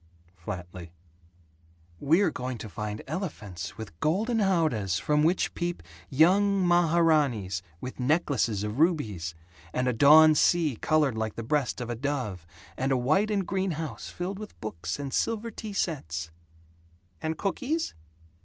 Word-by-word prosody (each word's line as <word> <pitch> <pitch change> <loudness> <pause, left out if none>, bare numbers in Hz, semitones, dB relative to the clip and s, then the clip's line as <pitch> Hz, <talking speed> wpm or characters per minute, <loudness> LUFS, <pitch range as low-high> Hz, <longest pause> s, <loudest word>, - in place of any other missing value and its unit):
flatly. 90 -2 -7 1.1
"We're 165 +5 +3
going 125 -2 -4
to 110 - -8
find 105 +2 -5
elephants 105 - -5
with 100 -7 -9
golden 220 +9 +1
howdahs 155 - +1
from 150 - +1
which 170 +4 +2
peep 175 - -3 0.3
young 190 - +4
maharanees 155 - +3 0.2
with 130 - -7
necklaces 125 - +1
of 105 +5 -4
rubies, 105 - +1 0.4
and 125 0 0
a 125 - +2
dawn 155 +6 +8
sea 155 -2 +3
colored 150 -4 +2
like 110 -1 -3
the 115 - -5
breast 135 +2 0
of 120 -1 -4
a - - -2
dove, 120 - -3 0.3
and 135 +1 -1
a 130 - +3
white 155 - +2
and 200 -3 0
green 190 -1 -1
house 155 -9 -5
filled 190 +3 -5
with 215 -1 -10
books 90 -5 -4
and 140 -2 -5
silver 230 0 -1
tea 215 0 -7
sets." 80 - -3 0.9
"And 160 0 -2
cookies?" 280 - -2
145 Hz, 145 wpm, -28 LUFS, 110-175 Hz, 1.1 s, dawn